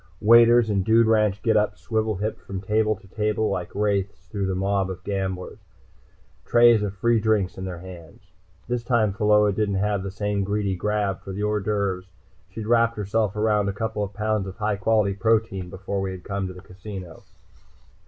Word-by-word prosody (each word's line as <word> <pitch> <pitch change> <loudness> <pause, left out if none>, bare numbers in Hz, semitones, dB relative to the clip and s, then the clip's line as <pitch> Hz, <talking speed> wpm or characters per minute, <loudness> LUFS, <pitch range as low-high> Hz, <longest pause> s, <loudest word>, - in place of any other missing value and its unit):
Waiters 115 +1 +6
in 100 -1 +1
dude 115 +4 +4
ranch 105 -2 +2
getups 105 -2 +2
swivel 110 -1 -1
hipped 105 +4 -4
from 95 -1 -6
table 110 +2 +1
to 95 - -18
table 105 +2 -1
like 90 -3 -3
wraithes 100 -1 -1
through 100 -2 -2
the 95 - -1
mob 95 0 0
of 95 -1 -7
gamblers, 95 -2 -4 0.8
trays 120 -2 +5
of 100 -1 -3
free 115 +4 +2
drinks 105 -3 +1
in 95 - -6
their 90 -2 -5
hands. 85 -1 -12 0.4
This 120 0 -2
time 115 -5 +1
Pheola 105 0 +3
didn't 100 -1 0
have 100 0 0
the 100 - -4
same 100 0 -2
greedy 100 -1 -1
grab 105 0 -1
for 95 - -7
the 100 +2 -4
hors 105 0 0
d'oeuvres. 100 -3 -1 0.4
She'd 105 +3 -7
wrapped 115 0 +2
herself 105 0 -1
around 105 -1 +1
a - - -2
couple 110 -1 -2
pounds 105 0 -2
of 95 - -8
high 105 -2 -1
quality 105 0 +2
protein 100 -2 0
before 95 +1 -4
we 95 - -2
had 95 -1 -7
come 100 -1 -3
to 95 - -7
the 90 - -12
casino. 95 -2 -9
105 Hz, 185 wpm, -24 LUFS, 95-110 Hz, 0.8 s, Waiters